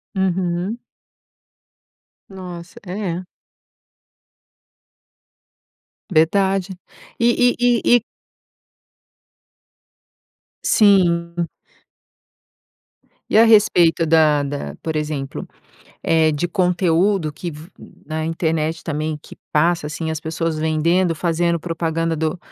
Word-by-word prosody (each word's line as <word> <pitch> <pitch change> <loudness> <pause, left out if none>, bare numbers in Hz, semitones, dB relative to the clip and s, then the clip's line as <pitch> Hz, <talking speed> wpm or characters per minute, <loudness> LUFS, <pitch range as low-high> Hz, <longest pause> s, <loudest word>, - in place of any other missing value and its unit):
Uhum. 185 +2 -1 1.5
Nossa, 180 -2 -9
é. 180 -1 -4 2.9
Verdade. 190 +3 +2 0.5
E 235 +1 +4
e 245 +1 +3
e 245 -1 +3 0.2
e - - -4 2.6
Sim. 175 -4 +3 1.8
E - - +3
a 225 - +8
respeito 180 -7 +4
da 155 -2 +4
da, 145 0 -5
por 160 -1 -4
exemplo, 150 -3 -4 0.6
eh, 160 -1 +3
de 150 +4 -2
conteúdo 180 -1 +1
que 170 +4 -6
v 155 +2 -11 0.4
na 155 +1 -3
internet 160 -1 -1
também, 155 -1 -3
que - - -13 0.2
passa, 165 +1 +2
assim, 160 +1 -4
as 160 - -3
pessoas 160 0 -3
vendendo, 165 +3 +1
fazendo 170 0 0
propaganda 165 0 -2
do 160 +2 -2
170 Hz, 90 wpm, -20 LUFS, 160-185 Hz, 2.9 s, a